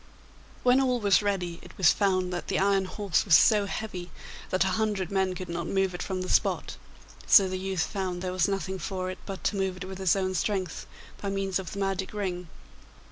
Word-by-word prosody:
When 250 +2 +5
all 250 -2 +1
was 200 -2 +4
ready, 180 -4 -2
it - - -14
was 180 -4 +6
found 185 -3 +1
that 175 - -4
the - - 0
iron 195 0 +2
horse 200 0 0
was 185 -7 +7
so 210 -3 +4
heavy 190 -4 -5 0.4
that 185 - +2
a 190 - 0
hundred 205 -4 -1
men 190 -1 +1
could 185 0 -6
not 170 0 -4
move 195 -1 0
it 175 - -5
from 185 -1 -3
the - - -5
spot, - - +1 0.5
so 195 -3 +7
the 185 0 -3
youth 190 -3 -1
found 185 -2 -3
there 185 - -2
was 180 -2 +2
nothing 190 -1 -2
for 185 +2 -3
it 185 - -9
but 195 -2 -6
to - - 0
move 190 -1 -1
it 185 - -6
with 190 0 -7
his 190 -2 +3
own 185 -1 -1
strength 185 -1 -2 0.3
by 200 - -2
means 195 -1 -1
of 180 -3 -7
the - - -7
magic 195 0 -2
ring. 180 -4 -3
190 Hz, 220 wpm, -28 LUFS, 185-195 Hz, 0.5 s, was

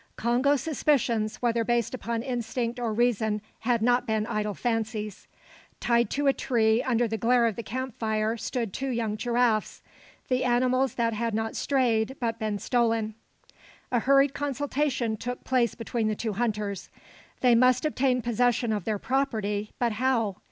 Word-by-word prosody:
Congo's 255 +4 +2
suspicions, 245 -8 +1
whether 235 -1 +2
based 235 0 0
upon 235 -2 -3
instinct 240 -1 -3
or 235 -2 -1
reason 220 -2 +1 0.2
had 235 -1 0
not 245 +1 +2
been 220 -1 0
idle 210 -2 -2
fancies. 220 -3 -3 0.5
Tied 235 0 +2
to 290 +1 -1
a 275 - +5
tree 225 -3 +2
under 240 -2 +1
the 220 0 -3
glare 235 +2 +3
of 225 -3 0
the - - -4
camp 260 +2 -4
fire 220 0 0
stood 230 -2 -3
two 270 0 -3
young 230 -4 -1
giraffes, 235 -1 0 0.4
the 255 -1 +1
animals 255 +1 +2
that 230 -1 +1
had 230 0 -1
not 225 0 -2
strayed 255 -3 +1
but 230 -2 -2
been 215 -1 -1
stolen. 225 -1 0 0.8
A 245 - +3
hurried 275 +2 +4
consultation 280 -4 -1
took 245 +3 -5
place 250 -3 +1
between 230 -1 -2
the 215 - 0
two 220 0 -3
hunters. 210 -3 -2 0.5
They 250 -2 +5
must 255 +3 +4
obtain 260 -4 +1
possession 240 0 +1
of 205 -5 -3
their 215 -1 0
property, 215 -4 -1
but 240 -1 +1
how? 225 -3 0
235 Hz, 160 wpm, -27 LUFS, 220-250 Hz, 0.8 s, a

